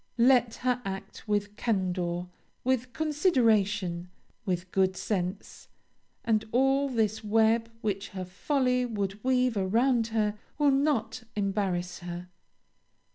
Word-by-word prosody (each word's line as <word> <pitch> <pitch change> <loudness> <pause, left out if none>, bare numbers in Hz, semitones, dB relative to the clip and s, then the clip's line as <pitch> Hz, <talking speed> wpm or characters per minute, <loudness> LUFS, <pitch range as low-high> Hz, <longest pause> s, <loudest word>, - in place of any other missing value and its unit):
Let 240 -1 +4
her 250 -1 +2
act 195 +2 -7
with 205 0 -1
candor, 180 -5 -1 0.4
with 255 -1 0
consideration, 220 - +1 0.4
with 180 0 -2
good 190 -1 +2
sense, 185 -1 -3 0.6
and 220 -2 +2
all 270 +3 +3
this 220 -3 0
web 225 +2 +3
which 200 -2 -2
her 185 -2 -5
folly 250 +6 +1
would 205 -4 -3
weave 255 -2 +2
around 225 +5 +2
her 215 -2 0 0.2
will 290 -1 +4
not 270 -5 +1
embarrass 195 -3 -1
her. 175 +1 -7
215 Hz, 115 wpm, -28 LUFS, 190-250 Hz, 0.6 s, Let